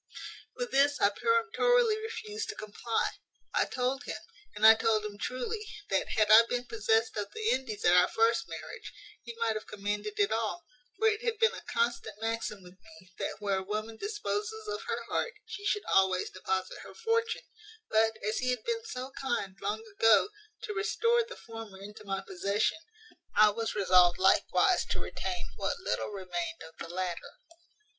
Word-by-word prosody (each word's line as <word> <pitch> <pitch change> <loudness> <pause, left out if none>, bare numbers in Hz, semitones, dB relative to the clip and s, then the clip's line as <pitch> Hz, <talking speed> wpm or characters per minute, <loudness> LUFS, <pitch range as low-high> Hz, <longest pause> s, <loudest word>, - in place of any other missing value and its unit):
"With - - -4
this 285 +1 +3
I 200 - +5
peremptorily 460 - +3
refused 435 -1 -5
to - - -4
comply. 215 +2 -2 0.4
I - - +3
told 260 +2 -2
him, - - -4 0.4
and 210 - +2
I 220 - +12
told 220 -1 +1
him 205 -1 -7
truly, 340 - -3 0.3
that, - - +1
had 215 -1 +4
I 220 +1 +11
been 245 0 -1
possessed 225 -1 +1
of 205 -1 -3
the 440 0 -1
Indies 235 -6 -2
at 175 - +6
our 180 0 +6
first 230 +1 +2
marriage, - - -8 0.3
he 235 -1 -9
might 230 -1 +1
have 215 - -6
commanded 210 +1 -3
it 205 0 +3
all; 225 +10 -1 0.3
for 445 - +3
it 430 +1 +1
had 465 -2 0
been 450 +1 +4
a - - -7
constant 465 - -1
maxim 225 -3 -3
with 180 +1 -15
me, 215 -4 -17
that - - -2
where 200 -2 0
a - - -5
woman 215 +3 -4
disposes 425 - -3
of 425 0 -3
her - - -2
heart, 460 - -2
she 405 -2 -5
should 415 - 0
always 190 -1 +2
deposit 190 0 -3
her - - -11
fortune; 455 0 0 0.4
but, 220 0 +2
as 215 - 0
he 255 - 0
had 250 - -1
been 460 -1 -2
so 260 - -6
kind, 240 -8 -3
long 210 +2 -2
ago, 220 - +4 0.3
to 425 - -4
restore 460 +3 +2
the 455 - -9
former 225 -4 -9
into 205 +2 -10
my 195 -1 -3
possession, 200 - 0 0.6
I 215 0 +7
was 225 +2 -3
resolved 180 -3 +5
likewise 350 - +4
to - - -2
retain 365 - -4
what - - -1
little - - -2
remained 175 -5 -4
of 160 0 -12
the 165 - -6
latter. 180 -1 -4
225 Hz, 180 wpm, -30 LUFS, -, 0.6 s, I